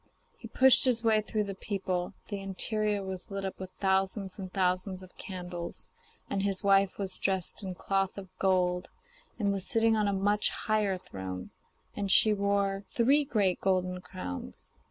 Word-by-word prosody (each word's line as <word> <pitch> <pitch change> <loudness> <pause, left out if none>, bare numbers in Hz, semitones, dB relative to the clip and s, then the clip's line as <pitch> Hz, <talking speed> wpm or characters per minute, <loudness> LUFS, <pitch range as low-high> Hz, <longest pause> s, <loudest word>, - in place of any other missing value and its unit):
He - - -10
pushed 265 0 +6
his 240 -3 +2
way 220 -1 +4
through 215 0 -1
the 200 -1 -4
people. 190 -2 -3 0.2
The 205 -2 -3
interior 205 +1 0
was 190 +2 -6
lit 195 -1 -4
up 190 - -5
with 190 -1 -6
thousands 190 +1 0
and 185 -1 -6
thousands 185 0 0
of 185 - -15
candles, 180 -2 -5 0.4
and 195 - -1
his 195 -1 0
wife 195 -1 +3
was 195 -2 -3
dressed 190 0 +1
in 190 -2 -5
cloth 195 +1 -1
of 190 -2 -9
gold 180 -1 +1 0.5
and 200 -3 +1
was 195 -2 -2
sitting 225 -1 +3
on 210 -1 +1
a - - +2
much 205 +2 +2
higher 215 -4 0
throne, 95 - -7 0.4
and 200 -1 -2
she 215 +3 +7
wore 200 -1 0
three 275 +5 +3
great 210 -9 +1
golden 185 -1 0
crowns. 180 - -7
195 Hz, 170 wpm, -30 LUFS, 185-205 Hz, 0.5 s, she